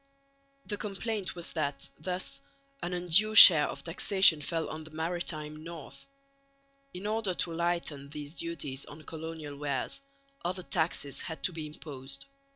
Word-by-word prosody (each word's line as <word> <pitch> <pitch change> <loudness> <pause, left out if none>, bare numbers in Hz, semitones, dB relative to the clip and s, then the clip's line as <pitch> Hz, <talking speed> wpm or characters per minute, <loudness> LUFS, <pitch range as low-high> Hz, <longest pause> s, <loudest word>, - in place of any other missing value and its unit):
The 205 - -3
complaint 205 -1 -4
was 170 -1 -5
that 140 -4 -3
thus 180 -3 -4 0.4
an 175 0 -4
undue 180 +5 +4
share 160 -8 +11
of - - -6
taxation 175 -1 +5
fell 165 +2 -2
on 155 0 -7
the 155 - -11
maritime 155 -2 -4
north. 165 - -10 0.8
In 180 +3 -8
order 210 -3 -1
to 170 - -1
lighten 170 -4 -1
these 145 0 -8
duties 145 -6 -4
on 150 +2 -12
colonial 160 -1 -8
wares, 140 - -3 0.4
other 185 +1 -3
taxes 160 -5 -1
had 160 - -8
to 185 - +1
be 160 -2 -6
imposed. 140 -3 -6
165 Hz, 145 wpm, -29 LUFS, 150-180 Hz, 0.8 s, share